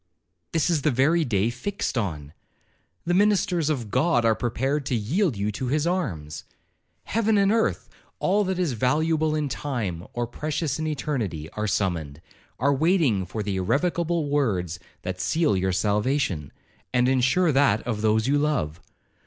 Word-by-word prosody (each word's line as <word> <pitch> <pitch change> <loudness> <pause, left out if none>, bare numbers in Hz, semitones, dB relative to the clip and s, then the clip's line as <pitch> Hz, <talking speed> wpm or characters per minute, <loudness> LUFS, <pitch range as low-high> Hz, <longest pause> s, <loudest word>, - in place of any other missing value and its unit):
'This 165 +2 +1
is 160 -4 +1
the 150 - +2
very 150 +6 +3
day 110 -4 +1
fixed 200 +8 -3
on. 80 - -3 0.7
The 175 - +1
ministers 185 -5 +2
of 120 -9 -2
God 155 -8 +2
are 115 - +5
prepared 130 +5 -1
to 125 - 0
yield 135 - 0
you 100 +2 -1
to 125 +5 -4
his 150 +4 +1
arms. 90 - -2 0.6
Heaven 220 -1 +1
and 200 0 +4
earth,—all 210 -2 -1
that 190 -1 -1
is 175 -7 0
valuable 155 +6 +1
in 150 -1 0
time, 110 - -3
or 120 0 -1
precious 150 +4 -3
in 155 - -2
eternity, 125 - -3
are 105 0 -3
summoned, 85 -8 -1 0.4
are 140 +3 +2
waiting 140 - +2
for 105 +3 -4
the 100 -2 -2
irrevocable 165 - 0
words 95 - 0 0.2
that 90 0 -4
seal 150 - +2
your 95 0 0
salvation, 105 - 0 0.4
and 125 0 +3
ensure 135 +7 +3
that 135 -6 +3
of 110 -3 -3
those 110 0 +2
you 145 +2 +2
love. 105 - -1
130 Hz, 155 wpm, -25 LUFS, 105-160 Hz, 0.7 s, are